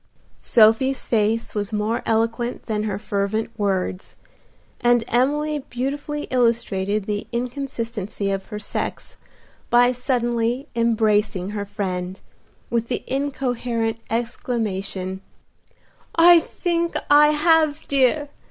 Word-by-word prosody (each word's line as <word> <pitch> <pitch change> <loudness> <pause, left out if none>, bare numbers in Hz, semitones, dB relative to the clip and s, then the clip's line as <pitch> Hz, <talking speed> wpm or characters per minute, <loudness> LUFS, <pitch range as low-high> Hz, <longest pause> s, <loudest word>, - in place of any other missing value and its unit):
Sophie's 240 +4 +4
face 225 0 0
was 205 -1 -2
more 215 +2 -1
eloquent 230 +2 0
than 215 -2 -1
her 200 -3 -2
fervent 205 +2 -2
words, 190 -3 -2 0.6
and 240 -2 +3
Emily 295 +5 +1
beautifully 285 +4 -3
illustrated 215 -5 +1
the 205 0 -3
inconsistency 235 -5 -3
of 195 0 -3
her 210 - -6
sex 210 - -4 0.5
by 245 +1 +5
suddenly 245 0 -1
embracing 215 -4 +1
her 205 -1 -3
friend, 185 -2 -4 0.5
with 235 -1 0
the - - -3
incoherent 245 -4 -2
exclamation, 200 -5 -3 0.9
"I 340 +1 +8
think 340 0 -2 0.2
I 295 +1 +8
have, 310 0 +2
dear! 280 +2 +2
230 Hz, 105 wpm, -22 LUFS, 210-265 Hz, 0.9 s, I